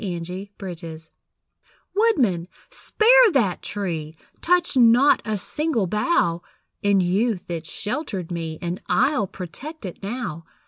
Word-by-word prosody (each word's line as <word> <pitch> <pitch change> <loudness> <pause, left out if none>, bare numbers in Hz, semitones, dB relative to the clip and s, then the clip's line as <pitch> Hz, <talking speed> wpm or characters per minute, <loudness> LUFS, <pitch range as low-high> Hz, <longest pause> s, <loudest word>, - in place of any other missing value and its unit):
[See 180 -4 -3 0.4
Notes] 165 -3 -8 0.8
Woodman, 255 - +2 0.2
spare 485 0 +5
that 215 -10 +1
tree! 165 -6 -4 0.3
Touch 355 -2 +2
not 245 +3 +5
a 215 -1 -1
single 295 - 0
bough! 180 - +1 0.4
In 200 -1 +3
youth 190 +1 0
it 165 -2 -4
sheltered 210 - -4
me, 165 -2 -4
And 175 +2 -3
I'll 265 -9 +2
protect 210 - -8
it 180 - -8
now. 195 -6 -4
200 Hz, 120 wpm, -23 LUFS, 170-265 Hz, 0.8 s, spare